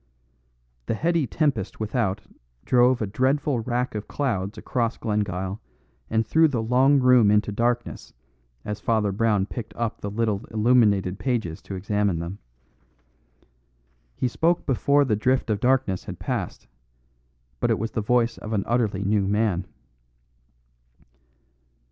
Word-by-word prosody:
The - - 0
heady 165 +2 +1
tempest 125 - -1
without 110 -2 -1 0.4
drove 125 -1 +3
a - - 0
dreadful 130 +5 0
wrack 125 +2 -2
of 105 -1 -5
clouds 105 -8 -2
across 115 -2 -2
Glengyle 100 -2 -2 0.5
and 110 0 +1
threw 160 +9 +4
the 135 -6 -2
long 130 +5 +3
room 125 -4 +5
into 105 0 +2
darkness 120 +3 -2 0.5
as 105 0 -4
Father 110 -3 +1
Brown 105 -1 +1
picked 110 +1 -7
up 115 -2 -3
the 100 - -3
little 105 -1 -1
illuminated 105 -4 +2
pages 110 -11 -2
to 100 - -7
examine 100 -1 0
them. 85 +4 -6 1.8
He 130 - 0
spoke 165 +8 +1
before 140 +2 +2
the 110 -5 +1
drift 125 +2 +1
of 105 - 0
darkness 125 -6 +1
had - - -7
passed; - - -4 0.9
but - - 0
it - - +2
was 115 +2 -3
the 110 - -2
voice 120 +2 +1
of 110 - -6
an 100 -3 0
utterly 110 -5 0
new 100 -1 +1
man. 100 -3 0
110 Hz, 135 wpm, -24 LUFS, 100-125 Hz, 1.8 s, room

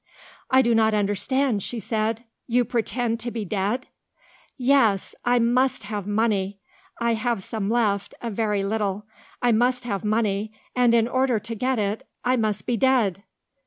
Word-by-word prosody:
"I 260 0 +5
do 235 -1 +2
not 220 -1 +3
understand," 210 +4 +1
she 235 +4 -4
said. 220 +2 -1 0.2
"You 245 0 +2
pretend 235 0 -1
to 240 +1 -3
be 230 -3 -4
dead?" 205 +6 -1 0.7
"Yes. 245 -7 +3
I 245 0 +3
must 245 +1 +2
have 205 -1 -5
money. 205 -2 0 0.4
I 235 0 +2
have 225 -2 -1
some 210 -1 -3
left 210 -4 0
a 235 - -4
very 210 -1 0
little. 205 0 -1 0.4
I 245 - +4
must 250 +3 +2
have 200 -5 -3
money; 215 -1 0 0.2
and, 245 -2 +4
in 230 -1 +3
order 255 -1 +1
to 225 +3 -6
get 250 +3 0
it, 205 0 -2 0.2
I 250 +1 +3
must 215 -5 -1
be 240 - 0
dead." 225 -7 +2
225 Hz, 160 wpm, -24 LUFS, 205-245 Hz, 0.7 s, I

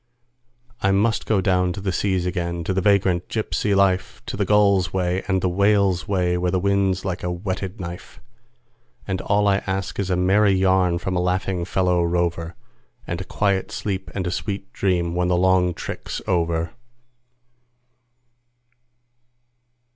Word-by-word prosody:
I 95 - +2
must 105 +3 +1
go 105 -4 +2
down 90 -1 +1
to 100 - -6
the 95 -1 -2
seas 95 -2 0
again, 85 -2 -2
to 95 - -1
the 95 - 0
vagrant 95 -3 +2
gypsy 105 -2 -1
life, 95 -1 +1
To - - -5
the 100 - 0
gull's 100 -3 +3
way 90 0 -1
and 95 -2 +1
the - - +3
whale's 100 0 +2
way, 90 -3 +1
where 90 0 0
the 95 - +1
wind's 95 -1 +1
like 95 -2 -3
a 90 - -2
whetted 95 +3 -4
knife; 85 -1 -8 0.9
And 95 -2 -2
all 105 0 +2
I 100 -1 +4
ask 95 +1 -3
is 100 -2 -1
a 90 - +2
merry 95 +3 +3
yarn 95 -2 +2
from 95 +2 -3
a 90 - +1
laughing 90 0 -1
fellow 90 -1 +1
rover, 85 0 -1 0.5
And 85 +2 -5
quiet 100 -2 0
sleep 95 -3 -4
and 95 -2 -2
a 90 - -1
sweet 100 +1 -4
dream 90 -3 0
when 90 0 0
the 90 -1 +2
long 90 0 +3
trick's - - -5
over. 85 0 0
95 Hz, 160 wpm, -22 LUFS, 90-100 Hz, 0.9 s, I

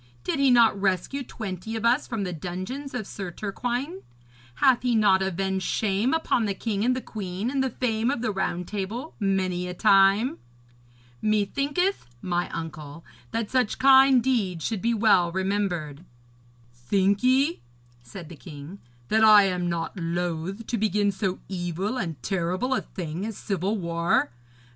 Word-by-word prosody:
Did - - -1
he 275 -1 +4
not 230 -5 +4
rescue 195 +8 0
twenty 220 -3 -6
of 225 +1 -3
us 245 +5 +3
from 225 -4 -3
the 180 -2 -3
dungeons 185 - -6
of 230 -4 -3
Sir 195 -2 -6
Turquine? 245 - -4 0.5
Hath 250 - +4
he 245 -2 +1
not 200 -3 +4
avenged 190 0 -1
shame 210 +5 0
upon 315 -7 +1
the 200 -2 -2
king 205 0 -2
and 250 +2 +2
the 255 - -3
queen, 200 +2 -4
and 275 -1 0
the 265 - 0
fame 230 -1 -1
of 245 -4 -2
the 220 - 0
Round 180 -2 -2
Table 215 +9 -5
many 185 -3 0
a 180 - -6
time? 200 +5 +4 0.8
Methinketh, 275 - 0
my 175 +4 -2
uncle, 160 -1 -7 0.2
that 225 -1 -3
such 255 -4 +1
kind 265 -2 +6
deeds 200 - 0
should 220 -5 -2
be 235 +1 +1
well 205 -6 +4
remembered.' 180 -5 -2 0.7
'Think 195 +11 +1
ye,' 270 +6 +2 0.4
said 140 +9 -10
the 170 - -10
king, 155 +4 -10 0.3
'that 220 +1 +3
I 210 -2 +8
am 180 -2 0
not 170 -1 -3
loath 175 +4 -3
to 235 - -2
begin 205 -1 +1
so 190 -1 -2
evil 185 +6 -3
and 165 - -4
terrible 185 +7 -1
a - - 0
thing 170 0 -6
as 220 -1 -5
civil 195 +2 -2
war? 170 -6 0
200 Hz, 160 wpm, -25 LUFS, 180-235 Hz, 0.8 s, I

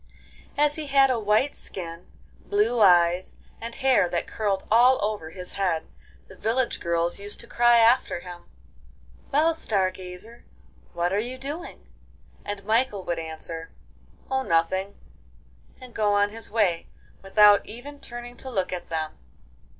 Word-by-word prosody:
As 295 +1 +3
he 310 -2 -5
had 270 -1 +5
a 245 - 0
white 215 +6 +2
skin, 170 -1 -6 0.4
blue 220 +4 +1
eyes, 175 -2 +4 0.3
and 230 +1 -6
hair 260 -9 +3
that 170 - -2
curled 200 -3 -2
all 245 +3 +6
over 210 -7 -3
his 180 +1 -7
head, 180 -5 -1 0.4
the - - -14
village 240 +3 -1
girls 170 +1 -1
used 205 +1 -6
to - - -11
cry 240 0 +4
after 230 -5 +3
him, 175 -1 -10 0.9
'Well, 315 +4 +3
Star 200 -12 0
Gazer, 185 +5 -10 0.5
what 175 +2 -1
are 200 - +2
you 245 +4 -4
doing?' 290 +7 -7 0.6
and 205 -1 -6
Michael 220 -2 +1
would 170 -2 -2
answer, 165 0 -7 0.6
'Oh, 265 0 +1
nothing,' 190 0 0 0.8
and 255 -2 -12
go 210 -2 +1
on 205 0 +2
his 225 +1 -8
way 200 -6 +1 0.3
without 205 +1 +5
even 280 +6 -9
turning 240 -1 -9
to 265 - -9
look 190 -7 -2
at 175 -1 -6
them. 160 -1 -3
205 Hz, 150 wpm, -25 LUFS, 180-245 Hz, 0.9 s, all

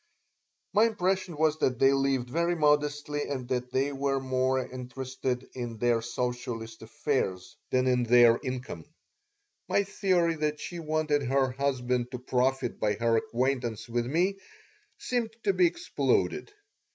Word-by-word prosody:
My 215 +2 +5
impression 185 -5 -1
was 155 0 +2
that 125 -2 +1
they 135 +2 +5
lived 135 -2 +1
very 170 +6 0
modestly 150 -1 +1
and 130 -3 -4
that 125 -1 -2
they 135 +3 +1
were 135 0 0
more 130 0 0
interested 130 0 -4
in 120 -3 -5
their 120 0 +2
socialist 120 -1 -4
affairs 110 -6 -2
than 130 0 +2
in 125 -1 +2
their 120 0 +6
income. 130 0 -5 0.8
My 200 - +3
theory 185 -4 +1
that 150 0 -1
she 175 - -6
wanted 155 -2 0
her 135 0 +1
husband 125 -2 -1
to - - -2
profit 125 0 0
by 105 -1 +1
her 115 +1 +1
acquaintance 120 -1 -1
with 120 0 -1
me 180 +8 +1 0.6
seemed 230 -3 -2
to 395 - +2
be 360 - +5
exploded. 345 +4 0
130 Hz, 140 wpm, -28 LUFS, 125-150 Hz, 0.8 s, their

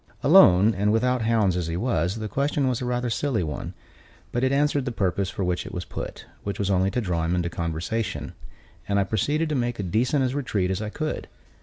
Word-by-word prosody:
Alone, 95 +5 +7
and 100 +2 +1
without 125 +3 +2
hounds 110 -5 +2
as 90 -2 -2
he 85 +1 -2
was, 90 -4 0
the 110 -1 -4
question 140 +3 0
was 125 -2 -1
rather 125 0 -1
a - - -4
silly 115 -4 0
one; 75 -2 -5 0.6
but 120 - -1
it 130 - +2
answered 145 -1 +2
the 125 - -2
purpose 95 -3 0
for 95 - -3
which 90 -1 -1
it - - -8
was 90 0 -5
put, - - -7 0.2
which 100 -1 -3
was 100 -1 0
only 95 0 +2
to 125 - -1
draw 90 -5 -1
him 85 +2 0
into 85 -1 -1
conversation, 85 +7 -3 0.5
and 100 0 +2
I - - +3
proceeded 145 - 0
to - - -1
make 120 -4 -1
as 100 - -2
decent 125 - +1
a 130 +1 -2
retreat 105 -9 -1
as 95 - -2
I 105 - -3
could. 155 +7 -4
110 Hz, 225 wpm, -25 LUFS, 90-125 Hz, 0.6 s, Alone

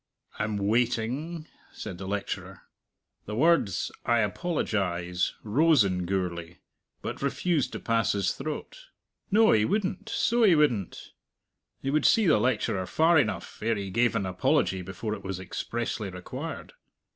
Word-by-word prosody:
"I'm 105 -1 -1
waiting!" 125 +9 -1 0.2
said 85 - -7
the 95 - -6
lecturer. 100 0 -4 0.6
The 105 - -4
words 135 - +2
"I 120 -1 +3
apologize" 95 - -1
rose 145 +5 +4
in 90 -2 -1
Gourlay, 90 -2 -3 0.5
but - - -5
refused 145 +1 0
to - - -4
pass 115 -1 +1
his 100 -2 +1
throat. 155 - -6 0.4
No, 220 +2 +5
he 105 -1 +4
wouldn't, 205 - -1
so 235 +1 +1
he 200 -7 +6
wouldn't! 120 - 0 0.7
He 135 - 0
would 155 +1 +1
see 225 -2 +4
the 155 - +5
lecturer 105 -5 0
far 160 0 +4
enough, 110 -6 -2
ere 115 +1 +1
he 100 -2 -5
gave 120 +3 +2
an 100 - 0
apology 95 0 +1
before 95 +4 -5
it 100 -2 -7
was 95 -1 -4
expressly 110 +2 -4
required. 90 -1 -7
110 Hz, 145 wpm, -27 LUFS, 95-155 Hz, 0.7 s, he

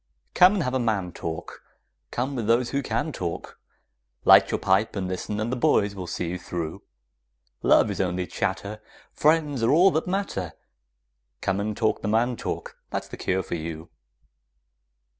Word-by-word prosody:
Come 185 +3 +6
and 185 - 0
have 125 -2 -2
a 130 - +1
man 105 -7 0
talk; 80 -1 -6 0.5
Come 130 +3 -2
with 115 -4 -2
those 120 +1 +2
who 140 - 0
can 125 +5 -2
talk; 85 - -5 0.7
Light - - +8
your - - -1
pipe 95 +4 +2
and 95 -2 -2
listen, 95 +3 -3
and 110 +2 -1
the - - 0
boys 120 -7 +2
will 95 -3 -6
see 85 - -3
you 90 +1 -4
through; 85 -3 -5 0.8
Love - - +4
is - - -2
only 90 0 -1
chatter, 105 +4 -3 0.3
Friends 150 -4 +2
are 115 - +3
all 180 +6 +6
that 160 +1 -1
matter; 180 - -2 0.9
Come 95 +1 0
and 105 +1 -2
talk 110 -2 +1
the - - -3
man 115 +3 +2
talk; - - -5
that's - - -4
the - - -7
cure 95 0 -1
for - - -6
you! 80 0 -5
110 Hz, 175 wpm, -25 LUFS, 90-130 Hz, 0.9 s, Light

